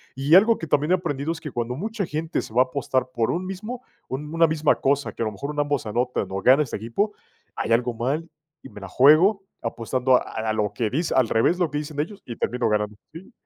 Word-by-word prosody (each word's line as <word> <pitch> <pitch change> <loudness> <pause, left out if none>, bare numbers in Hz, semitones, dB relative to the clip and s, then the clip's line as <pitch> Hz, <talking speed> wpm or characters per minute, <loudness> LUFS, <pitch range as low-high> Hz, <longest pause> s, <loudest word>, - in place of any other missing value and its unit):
Y 140 +5 +3
algo 220 +4 +6
que 165 - -6
también 145 +3 +1
he 185 - +6
aprendido 145 -3 -3
es 165 - -9
que 150 - -6
cuando 120 0 -3
mucha 210 - -3
gente 160 +1 -2
se 110 - -11
va 125 - +5
a - - -11
apostar 130 -1 -1
por 115 -2 0
un 180 +2 -2
mismo 215 +7 -6 0.2
un 150 +4 -5
una 165 0 +4
misma 155 -1 +2
cosa, 140 +1 0
que - - -8
a - - -1
lo 110 - -2
mejor 140 +9 -5
en 150 - -4
ambos 145 -4 0
anotan 120 +4 -1
o 95 - -3
gana 135 +8 +5
este 125 - -5
equipo, 160 - -2 0.4
hay - - -3
algo 120 +1 +1
mal 140 +8 -2 0.4
y 135 - -10
me 105 - -12
la 95 - -7
juego, 160 - +5 0.2
apostando 125 +3 +1
a - - 0 0.3
a - - +1
lo 105 -2 0
que 110 0 -1
dis 160 +8 -1
al 130 -3 +3
revés 115 +10 +2
de 180 - +1
lo 160 - -6
que 145 - -1
dicen 150 -1 -6
ellos, 195 +7 -4
y 120 - -6
termino 120 -2 -1
ganando 105 0 -1 0.2
Sí, 180 +8 -11
140 Hz, 255 wpm, -24 LUFS, 120-165 Hz, 0.4 s, algo